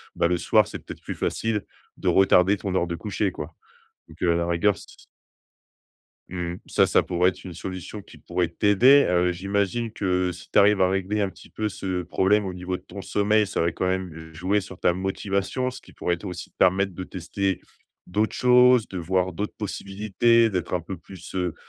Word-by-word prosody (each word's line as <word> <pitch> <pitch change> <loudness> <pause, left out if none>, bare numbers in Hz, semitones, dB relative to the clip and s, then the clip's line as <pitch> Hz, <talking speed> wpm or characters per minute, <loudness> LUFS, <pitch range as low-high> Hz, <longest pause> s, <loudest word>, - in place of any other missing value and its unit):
bah, - - +2
le 90 0 +1
soir, - - +3
c'est - - -7
peut-être - - -10
plus - - -6
facile 110 -3 -1 0.3
de - - -5
retarder 95 0 +5
ton 100 -1 -4
heure 90 - +1
de 85 - -3
coucher, 100 +2 -2
quoi, 75 -4 -7 0.6
donc, 80 +1 -15
heu, 85 -2 +3
à - - +1
la 85 0 0
rigueur, 85 +4 +2
s - - -12 1.5
Mmh 90 -1 -4
ça - - +3
ça - - +3
pourrait 90 +1 +2
être 95 - -10
une 90 - -8
solution 95 +3 -7
qui - - -16
pourrait 90 -1 -1
t'aider. 110 +11 +5
Heu, 90 0 +2
j'imagine 100 +5 -1
que 90 -3 0
si 90 +1 -12
tu - - +5
arrives 100 -1 +5
à 90 - +4
régler 95 +2 -1
un 100 - +1
petit - - -16
peu 110 - -2
ce 95 -3 -3
problème 95 +4 +2
au 95 - -4
niveau 90 0 -4
de - - -18
ton 100 +2 -9
sommeil, 105 +2 +2
ça - - -1
va 85 +1 +1
quand 90 - -2
même 85 -4 -4
jouer 95 +6 0
sur 95 -1 -11
ta 90 - +3
motivation, 100 +6 -2
ce - - -10
qui - - -18
pourrait 85 +1 -2
aussi 90 -2 -7
te - - -54
permettre 95 +1 +3
de 95 - -6
tester 95 +1 -3 0.5
d'autres 105 +5 0
choses, 125 -1 +5
de 95 - -7
voir 90 +1 0
d'autres 105 +5 -4
possibilités, 110 +3 +1
d'être 90 -4 -3
un 90 - 0
peu 90 +3 -7
plus, 90 -2 -12
heu, 90 -3 -1
95 Hz, 210 wpm, -25 LUFS, 90-105 Hz, 1.5 s, retarder